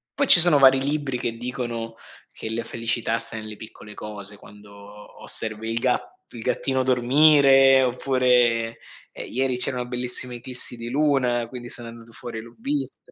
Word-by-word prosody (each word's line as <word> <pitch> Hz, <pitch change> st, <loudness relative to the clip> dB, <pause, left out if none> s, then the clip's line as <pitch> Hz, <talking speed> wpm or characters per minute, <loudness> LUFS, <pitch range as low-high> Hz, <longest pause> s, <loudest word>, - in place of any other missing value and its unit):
poi 280 Hz, -, 0 dB
ci 180 Hz, -, +9 dB
sono 165 Hz, -4 st, +7 dB
vari 135 Hz, -1 st, +6 dB
libri 140 Hz, -2 st, -2 dB
che 115 Hz, -1 st, -3 dB
dicono 120 Hz, -2 st, -5 dB, 0.4 s
che -, -, -9 dB
la 115 Hz, +1 st, -3 dB
felicità 115 Hz, 0 st, -2 dB
sta -, -, -5 dB
nelle 110 Hz, -1 st, -8 dB
piccole 105 Hz, -1 st, -12 dB
cose: 105 Hz, -1 st, -5 dB
quando 105 Hz, 0 st, -15 dB
osservi 110 Hz, 0 st, -2 dB
il 115 Hz, -, -1 dB
ga 125 Hz, +1 st, -1 dB, 0.3 s
il 120 Hz, -, -9 dB
gattino 130 Hz, +3 st, -1 dB
dormire 135 Hz, +1 st, +5 dB
oppure, 125 Hz, -3 st, +1 dB, 0.3 s
ehm, -, -, -9 dB
ieri 130 Hz, +1 st, -1 dB
c'era 125 Hz, 0 st, -1 dB
bellissima 125 Hz, 0 st, -4 dB
eclissi 125 Hz, 0 st, -3 dB
di 115 Hz, 0 st, -6 dB
luna, 130 Hz, -4 st, 0 dB
quindi 120 Hz, 0 st, -9 dB
sono 120 Hz, -1 st, -2 dB
andato 115 Hz, 0 st, -13 dB
fuori 115 Hz, 0 st, -8 dB
e -, -, -7 dB
l'ho 115 Hz, +1 st, -15 dB
vista. 285 Hz, -, -4 dB
120 Hz, 165 wpm, -23 LUFS, 115-130 Hz, 0.4 s, ci